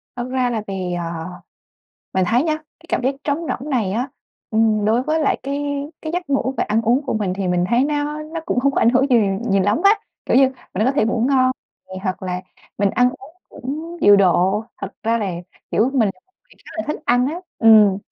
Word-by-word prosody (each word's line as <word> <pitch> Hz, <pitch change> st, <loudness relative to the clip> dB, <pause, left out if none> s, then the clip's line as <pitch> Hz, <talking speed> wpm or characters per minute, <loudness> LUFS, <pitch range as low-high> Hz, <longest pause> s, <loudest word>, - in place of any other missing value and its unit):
Thật 245 Hz, 0 st, -4 dB
ra 255 Hz, -1 st, +1 dB
là 225 Hz, -3 st, -2 dB
vì, 185 Hz, -2 st, -3 dB
ờ, 170 Hz, -1 st, -4 dB, 0.9 s
mình 185 Hz, -1 st, +3 dB
thấy 235 Hz, +6 st, +3 dB
nhá, 315 Hz, -1 st, 0 dB
cái 315 Hz, +2 st, -20 dB
cảm -, -, 0 dB
giác 265 Hz, +2 st, +1 dB
trống 290 Hz, -1 st, 0 dB
rỗng 280 Hz, +4 st, -4 dB
này 220 Hz, -8 st, 0 dB
á, 245 Hz, +6 st, -1 dB, 0.4 s
ừm, 220 Hz, -1 st, +2 dB
đối 225 Hz, +4 st, +2 dB
với 310 Hz, +3 st, 0 dB
lại 295 Hz, -, +1 dB
cái 280 Hz, +1 st, -3 dB, 0.4 s
cái 315 Hz, 0 st, -4 dB
giấc 350 Hz, -5 st, -3 dB
ngủ 265 Hz, -1 st, 0 dB
và -, -, +1 dB
ăn 220 Hz, +2 st, 0 dB
uống 245 Hz, +5 st, +2 dB
của -, -, -1 dB
mình 205 Hz, -4 st, -1 dB
thì 195 Hz, -1 st, -2 dB
mình 180 Hz, 0 st, +1 dB
thấy 240 Hz, +3 st, +3 dB
nó 295 Hz, +1 st, -2 dB
nó 320 Hz, +2 st, -6 dB
cũng 250 Hz, -, +1 dB
không 275 Hz, +2 st, +2 dB
có -, -, 0 dB
ảnh 230 Hz, -, +5 dB
hưởng 260 Hz, +2 st, +3 dB
gì 245 Hz, -, +6 dB, 0.3 s
nhiều 195 Hz, -1 st, +3 dB
lắm 205 Hz, -, +1 dB
á. 400 Hz, -, +7 dB, 0.3 s
Kiểu -, -, +2 dB
như 275 Hz, -, +7 dB
mình 265 Hz, -, -4 dB, 0.2 s
vẫn 215 Hz, +4 st, +1 dB
có 260 Hz, -, +2 dB
thể 270 Hz, -6 st, +2 dB
ngủ 230 Hz, 0 st, 0 dB
ngon 255 Hz, -1 st, +4 dB, 0.4 s
nè 190 Hz, -, -9 dB
hoặc 185 Hz, -1 st, -3 dB
là 180 Hz, -1 st, -3 dB, 0.4 s
mình 200 Hz, -1 st, +2 dB
ăn 250 Hz, +3 st, +3 dB
uống 290 Hz, +5 st, -14 dB
cũng 310 Hz, +7 st, -6 dB
điều 205 Hz, 0 st, +7 dB
độ. 190 Hz, +2 st, +3 dB, 0.2 s
Thật 195 Hz, -, -5 dB
ra 230 Hz, +1 st, +1 dB
là, 200 Hz, -3 st, -2 dB, 0.4 s
kiểu, 235 Hz, +5 st, +2 dB
mình 230 Hz, -6 st, +3 dB
là 185 Hz, -, -28 dB
một 375 Hz, -, -42 dB
người -, -, -24 dB
khá -, -, -12 dB
là 325 Hz, -, -2 dB
thích 300 Hz, -, -2 dB
ăn 245 Hz, +1 st, +3 dB
á 325 Hz, +5 st, -4 dB, 0.2 s
ừm, 215 Hz, -4 st, +6 dB
240 Hz, 240 wpm, -20 LUFS, 205-280 Hz, 0.9 s, á